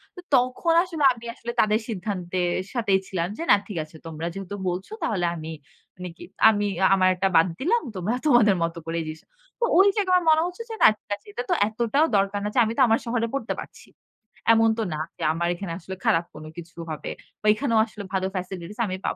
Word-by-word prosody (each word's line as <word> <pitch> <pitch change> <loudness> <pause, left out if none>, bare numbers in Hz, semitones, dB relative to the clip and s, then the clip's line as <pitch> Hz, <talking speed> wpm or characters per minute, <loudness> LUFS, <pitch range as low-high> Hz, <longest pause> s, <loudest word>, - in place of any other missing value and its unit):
তো - - -10 0.2
তখন 255 +6 +2
আসলে 335 -5 -4
আমি 235 -1 -13
আসলে 235 - -5
তাদের 215 0 +2
সিদ্ধান্তের 185 -3 -2 0.2
সাথেই 210 -6 +2
ছিলাম 175 -3 -2
যে - - -4
না - - +9
ঠিক 205 - -6
আছে 155 +1 -16
তোমরা 165 +1 -5
যেহেতু 195 +1 -6
বলছ 180 +2 -4 0.2
তাহলে 185 -5 0
আমি 160 -1 -7 0.5
মানে 180 0 -7
কি - - -11 0.3
আমি 205 -1 +1 0.2
আ - - +7
আমার 185 -1 +4
একটা 195 +2 +1
বাদ 165 - +6
দিলাম। 450 - +2
তোমরা 190 +6 -1
তোমাদের 240 -9 +5
মত 165 +1 -2
করেই 165 0 -2
জিস 155 0 -7 0.4
তো 475 - +2
ওই 385 +2 +7
জায়গায় 375 -3 +3
আমার 335 - -6
মনে 315 0 +4
হচ্ছে 360 +6 -7
যে 450 - -4
না - - +10
ঠিক - - -67
আছে 205 - -23
এটা 245 - -3
তো - - +3
এতটাও 235 +7 +1
দরকার 195 +1 0
না 210 - 0
যে - - +4
আমি 220 - -2
তো - - +3
আমার 225 0 +3
শহরে 230 -1 0
পড়তে 275 -4 -2
পারছি। - - -11 0.7
এমন 225 0 +4
তো 225 - 0
না 155 - -4 0.2
যে - - -6
আমার 170 +1 -1
এখানে 175 0 -6
আসলে 190 0 -7
খারাপ 165 +1 +3
কোন 155 - -9
কিছু 170 0 -10
হবে। 155 - -5 0.3
বা - - -12
এইখানেও 230 0 +1
আসলে 215 -2 -9
ভালো 190 0 0
facilities 185 +2 -6
আমি 185 -1 -3
পাব। - - -1
205 Hz, 220 wpm, -25 LUFS, 180-240 Hz, 0.7 s, না